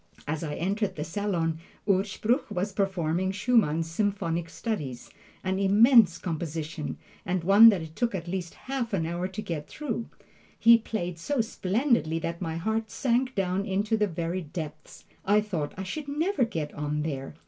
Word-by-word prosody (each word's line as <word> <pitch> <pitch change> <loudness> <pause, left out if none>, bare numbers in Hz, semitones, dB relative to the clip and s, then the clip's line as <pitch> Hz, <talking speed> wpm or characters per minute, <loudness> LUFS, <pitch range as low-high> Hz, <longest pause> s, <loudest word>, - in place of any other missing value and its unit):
As 155 +2 -2
I 150 -2 -3
entered 195 +2 -1
the 150 - -3
salon, 165 -2 -1 0.3
Urspruch 215 +7 +1
was 195 0 -2
performing 190 -2 0
Schumann's 195 -7 +2
"Symphonic 170 -3 -1
Studies" 150 - -4 0.3
an 190 0 0
immense 205 0 +6
composition, 160 -2 -4 0.3
and 180 -3 -1
one 200 +5 +9
that 195 -6 +1
it 160 0 -10
took 235 -4 0
at 175 -2 -5
least 175 -1 -4
half 255 -4 -2
an 170 -5 +1
hour 175 +2 -2
to 190 +3 -6
get 165 -7 -4
through. 280 -6 -4 0.5
He 230 0 +7
played 180 -7 -4
so 285 - -1
splendidly 225 - +1
that 170 +1 -4
my 165 -3 -2
heart 220 +5 -1
sank 255 0 0
down 190 -1 0
into 205 +2 0
the 210 -1 +2
very 170 +1 -3
depths. 155 -2 -8 0.2
I 205 +2 +4
thought 175 -9 -2
I 190 - -3
should 285 +10 -5
never 305 +1 +1
get 160 -9 -4
on 150 0 -2
there! 140 -2 -4
190 Hz, 165 wpm, -27 LUFS, 165-220 Hz, 0.5 s, one